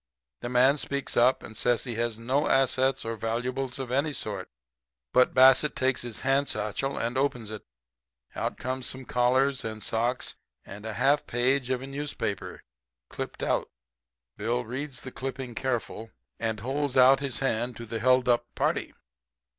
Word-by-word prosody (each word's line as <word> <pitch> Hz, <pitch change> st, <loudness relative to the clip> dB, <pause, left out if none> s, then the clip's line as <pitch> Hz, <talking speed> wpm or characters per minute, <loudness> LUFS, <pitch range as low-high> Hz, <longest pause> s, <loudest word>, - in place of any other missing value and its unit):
"The 120 Hz, -, -5 dB
man 130 Hz, +4 st, +4 dB
speaks 140 Hz, -1 st, -2 dB
up 125 Hz, +2 st, +4 dB
and 110 Hz, -, -10 dB
says 120 Hz, +1 st, +1 dB
he 125 Hz, -, -4 dB
has 115 Hz, -1 st, -1 dB
no 130 Hz, +6 st, 0 dB
assets 135 Hz, -1 st, +2 dB
or 115 Hz, 0 st, -2 dB
valuables 125 Hz, +4 st, -2 dB
of 130 Hz, -2 st, -5 dB
any 145 Hz, +3 st, +1 dB
sort. 100 Hz, -7 st, -4 dB, 0.6 s
But 125 Hz, -, +4 dB
Bassett 130 Hz, +3 st, +6 dB
takes 130 Hz, 0 st, +1 dB
his 120 Hz, -2 st, -5 dB
hand 135 Hz, +1 st, +2 dB
satchel 110 Hz, +6 st, -2 dB
and 120 Hz, +3 st, -1 dB
opens 125 Hz, -6 st, -1 dB
it. 110 Hz, -, -6 dB, 0.7 s
Out -, -, -2 dB
comes 130 Hz, 0 st, -3 dB
some 130 Hz, 0 st, -4 dB
collars 130 Hz, +3 st, +2 dB
and 110 Hz, -2 st, -5 dB
socks 120 Hz, +4 st, 0 dB, 0.3 s
and 105 Hz, +2 st, -9 dB
a 110 Hz, -, -4 dB
half 135 Hz, +6 st, +3 dB
a -, -, -36 dB
page 125 Hz, +2 st, +1 dB
of 130 Hz, 0 st, -1 dB
a -, -, -5 dB
newspaper 140 Hz, -7 st, -4 dB, 0.5 s
clipped -, -, -5 dB
out. -, -, 0 dB, 0.7 s
Bill 120 Hz, +3 st, -1 dB
reads 130 Hz, +4 st, -5 dB
the 130 Hz, -, -8 dB
clipping 130 Hz, -2 st, -5 dB
careful, 115 Hz, -2 st, -3 dB, 0.3 s
and 110 Hz, -2 st, -2 dB
holds 135 Hz, +2 st, -1 dB
out 130 Hz, +1 st, +7 dB
his 135 Hz, -3 st, -2 dB
hand 120 Hz, -2 st, -1 dB
to 115 Hz, -, -7 dB
the 115 Hz, 0 st, -4 dB
held 125 Hz, +1 st, +3 dB
up 120 Hz, -1 st, +2 dB
party. -, -, -1 dB
125 Hz, 170 wpm, -28 LUFS, 115-135 Hz, 0.7 s, out